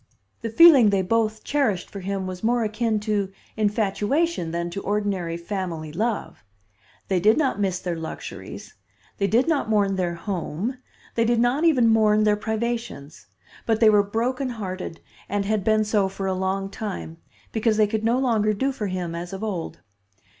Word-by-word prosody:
The 230 - -3
feeling 270 -3 +8
they 195 -2 +1
both 220 +2 0
cherished 250 -11 0
for 200 - -6
him 195 0 -3
was 185 0 -6
more 235 +1 +2
akin 215 0 0
to 205 -2 -1 0.2
infatuation 215 - 0
than 170 +1 -3
to 200 - -4
ordinary 195 -5 -1
family 170 -4 -4
love. 220 +5 -2 0.6
They 190 -2 +1
did 215 +7 +4
not 270 -9 +1
miss 190 -3 0
their 180 -1 -3
luxuries, 160 -1 -8 0.5
they 200 - +2
did 235 +8 +2
not 300 -8 +1
mourn 200 -3 +2
their 175 -2 -1
home, 190 - -4 0.3
they 230 - +2
did 235 0 +2
not 250 +7 +2
even 260 -8 +4
mourn 215 -1 +4
their 210 -1 +4
privations; 220 -8 -4 0.4
but 225 -1 +2
they 220 -2 +6
were 210 -1 +5
broken 240 +6 -1
hearted 185 -7 -6 0.3
and 200 0 -1
had 210 -1 0
been 215 +1 +3
so 210 -2 +1
for 195 0 -5
a 190 - 0
long 190 +1 -2
time, 195 -7 -6 0.3
because 220 -1 +1
they 215 - +5
could 215 +1 -2
no 230 +2 +2
longer 225 -5 +2
do 270 +7 0
for 215 -6 -4
him 180 -3 -3
as 175 +2 -6
of 195 +2 -5
old. 190 -7 -4
210 Hz, 175 wpm, -24 LUFS, 190-230 Hz, 0.6 s, feeling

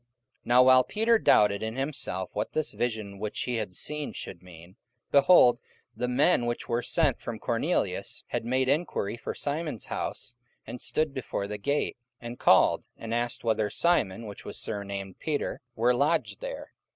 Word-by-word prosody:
44:010:017 120 - -48 0.4
Now 125 +1 +6
while 130 0 +7
Peter 225 - +2
doubted 105 - +4
in 110 +1 -3
himself 135 - -3
what 105 +1 -3
this 155 -1 0
vision 110 -5 -3
which 105 0 -3
he 125 -2 -1
had 105 -5 -4
seen 150 - -1
should 85 - -8
mean, 90 0 -14 0.4
behold, 140 -4 +6 0.3
the 125 - -2
men 125 0 +3
which 120 - -3
were 120 +1 0
sent - - +1
from - - -5
Cornelius - - -1
had - - -2
made 130 +2 0
enquiry 140 - 0
for - - -6
Simon's 150 -4 -3
house, 120 - -4 0.3
and 125 - -8
stood 155 -2 0
before 125 -6 -3
the 105 +1 -5
gate, 140 +5 -1 0.2
44:010:018 120 - -8
And 120 - -9
called, - - +5
and 115 0 -5
asked 120 0 -1
whether 110 -2 +1
Simon, 115 - +1
which 105 -1 -9
was - - -6
surnamed 100 -2 -5
Peter, 150 -2 -2
were 120 +2 +3
lodged 150 +6 0
there. - - -6
120 Hz, 175 wpm, -28 LUFS, 105-140 Hz, 0.4 s, while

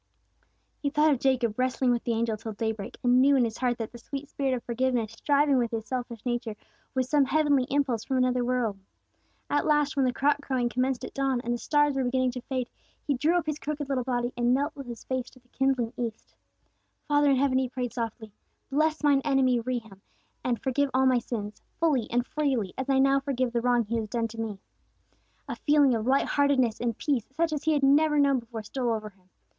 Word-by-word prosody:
He 285 - -1
thought 305 +1 +3
of 265 - -2
Jacob 250 -4 +1
wrestling 255 0 +1
with 240 -1 0
the 235 - +1
angel 225 -1 0
till 220 +1 -7
day 220 +2 -1
break, 205 -3 -8
and 250 +1 +5
knew 280 +1 +5
in 260 - +4
his 225 -1 -5
heart 245 -2 0
that 225 -2 -5
the 240 - -11
sweet 275 +4 -7
spirit 270 -2 -1
of 240 - -6
forgiveness 240 -2 -1
striving 280 +3 +2
with 235 -1 0
his 225 -1 -4
selfish 245 -3 -5
nature 240 -3 -2 0.4
was 260 -1 +1
some 285 0 +3
heavenly 285 -2 +2
impulse 270 -5 0
from 265 - -1
another 250 -1 +2
world. 240 -5 -1 0.7
At 290 - 0
last 295 -1 +2
when 275 -2 +2
the 250 - +2
cock 285 +4 +1
crowing 255 -4 -1
commenced 255 +1 -1
at - - -9
dawn, 270 -2 0
and 240 0 -2
the 240 - -3
stars 295 +1 +2
were 270 -1 0
beginning 255 0 +1
to 250 0 -6
fade, 255 -1 -3 0.4
he 290 - +1
drew 305 +7 +1
up 345 - -1
his 305 -1 -3
crooked 290 -1 -4
little 260 -2 0
body, 245 -1 -1
and 245 +1 +2
knelt 285 +3 -1
with 275 -3 -8
his 235 -1 -8
face 260 -1 -3
to 255 - -20
the 250 0 -34
kindling 260 -4 0
east. 230 -3 -5 0.7
"Father 290 -1 +3
in 275 - +4
heaven," 260 0 +2
he 260 -1 -1
prayed 250 -1 -4
softly, 225 -2 -5 0.4
"bless 310 +2 +1
mine 285 -2 +4
enemy 265 -4 +2
Rehum, 225 -5 -5 0.4
and 240 -3 0
forgive 275 +3 0
all 265 0 +4
my 255 -1 +4
sins, 215 -3 -6 0.2
fully 290 -9 +1
and 245 +1 0
freely 265 -10 -1
as 265 +1 -4
I 270 - +3
now 275 +1 +4
forgive 260 -3 -2
the 235 - +1
wrong 245 -1 +2
he 230 +3 -2
has 220 -2 -3
done 230 0 -1
to 225 +1 -6
me." 215 -3 -4 0.9
A - - -5
feeling 290 -3 +4
of 225 0 -2
light 270 +1 +3
heartedness 270 -6 +2
and 235 -2 -2
peace, 270 -7 -1
such 330 0 +1
as 295 - -4
he 315 - +3
had 290 -2 0
never 300 +2 +4
known 280 -2 +4
before, 230 -2 -8
stole 240 +1 -1
over 215 -1 -5
him. 185 -1 -31
255 Hz, 225 wpm, -27 LUFS, 235-280 Hz, 0.9 s, and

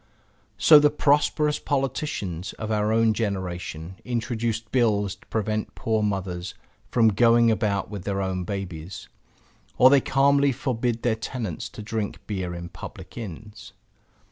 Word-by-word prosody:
So 155 -2 +8
the 150 0 +5
prosperous 150 +1 +2
politicians 130 - -2
of 110 0 -5
our 105 0 +1
own 115 0 +3
generation 95 -5 -4
introduce 115 -2 -2
bills 110 -4 +1
to 100 - -19
prevent 110 0 -2
poor 110 -1 0
mothers 95 -3 -3 0.3
from 115 -2 +4
going 115 +2 +4
about 105 -3 -1
with 100 -3 -6
their 100 -1 -2
own 95 -1 -2
babies; 90 -3 -6 0.7
or 130 +1 +7
they 140 -1 +6
calmly 140 +2 +3
forbid 120 -2 -2
their 120 - +2
tenants 110 - -5
to 105 - -9
drink 110 -1 -3
beer 95 -4 -3
in 85 0 -7
public - - -10
inns. 105 -1 -9
110 Hz, 140 wpm, -25 LUFS, 95-120 Hz, 0.7 s, So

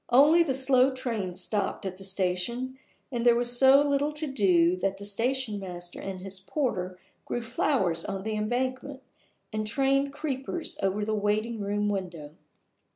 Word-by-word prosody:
Only 295 +7 +6
the 285 -6 +1
slow 265 -1 +4
trains 220 -8 -3
stopped 200 +1 -2
at 190 -1 -4
the - - -10
station 195 +8 -2 0.3
and 240 -2 -2
there 240 -1 +6
was 240 0 +3
so 270 +3 +7
little 285 +1 +1
to 300 +1 -3
do 185 - +3
that 195 +1 -1
the 200 - -8
station 230 +1 -1
master 175 -2 -8
and 190 -1 -6
his 195 0 -4
porter 190 -6 -2 0.3
grew 240 - -3
flowers 225 - 0
on 195 -1 -4
the 220 +1 -2
embankment, 255 +5 -2 0.5
and 215 0 -2
trained 275 +4 +1
creepers 285 +2 -4
over 195 +2 0
the 215 - -1
waiting 215 +2 0
room 205 +1 -1
window. 180 -7 -4
220 Hz, 160 wpm, -28 LUFS, 195-265 Hz, 0.5 s, so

